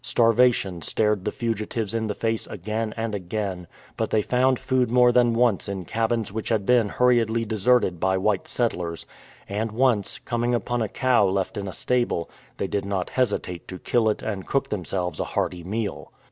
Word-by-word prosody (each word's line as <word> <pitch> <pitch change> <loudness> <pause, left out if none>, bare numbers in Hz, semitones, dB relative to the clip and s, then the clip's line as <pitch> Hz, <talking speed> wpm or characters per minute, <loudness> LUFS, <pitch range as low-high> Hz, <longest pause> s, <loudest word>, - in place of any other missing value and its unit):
Starvation 115 -6 +3
stared 105 +3 0
the - - 0
fugitives 115 -2 -2
in 115 -1 -1
the 105 - -3
face 115 -1 -1
again 110 +3 -3
and 115 -1 -2
again, 95 -2 -3 0.3
but - - -1
they 110 -1 +2
found 130 +2 +2
food 130 -1 +1
more 125 0 +5
than 120 -1 +3
once 115 -6 +2
in 95 -2 -4
cabins 115 0 -1
which 110 +1 -4
had 110 -4 +1
been 120 -3 +4
hurriedly 115 -2 +2
deserted 110 -4 +2
by 95 +1 +2
white 95 0 0
settlers, 90 -9 -2 0.4
and 105 +2 -2
once, 115 -3 +1
coming 120 0 -1
upon 120 0 -1
a 110 - -1
cow 130 -4 +3
left 95 +3 -1
in 100 -2 -4
a - - -4
stable, 120 -6 -1 0.3
they - - -1
did 100 +1 -2
not 100 -2 -2
hesitate 105 -8 -1
to 95 - -7
kill 110 +3 +1
it 105 - -2
and 100 -4 -4
cook 135 - 0
themselves 90 -3 -3
a - - +1
hearty 85 0 -1
meal. 105 +3 -4
110 Hz, 185 wpm, -24 LUFS, 95-120 Hz, 0.4 s, more